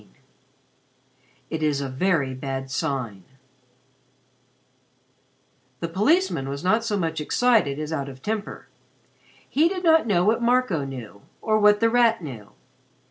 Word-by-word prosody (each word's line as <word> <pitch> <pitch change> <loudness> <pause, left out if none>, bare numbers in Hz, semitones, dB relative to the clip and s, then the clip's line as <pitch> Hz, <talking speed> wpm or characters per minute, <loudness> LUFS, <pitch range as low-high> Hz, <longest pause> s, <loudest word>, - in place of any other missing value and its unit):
XVII - - -25 1.4
"IT 160 -1 -3
IS 150 -2 +1
A 140 - -3
VERY 140 0 0
BAD 135 0 -5
SIGN" 130 - -3 2.6
The 170 - -3
policeman 210 - +1
was 140 +3 -5
not 220 +5 +2
so 215 -3 -1
much 160 -4 -2
excited 215 - +2
as 155 +1 -4
out 140 -3 -3
of 130 -1 -13
temper. 215 -1 -4 0.8
He 315 +4 +2
did 365 -1 -4
not 320 -5 +4
know 180 -5 +2
what 225 +3 +2
Marco 235 - +1
knew 120 -7 -9 0.2
or 215 -1 +1
what 210 0 +4
The 230 - +4
Rat 230 -5 +3
knew. 120 -9 -8
165 Hz, 135 wpm, -24 LUFS, 135-225 Hz, 2.6 s, not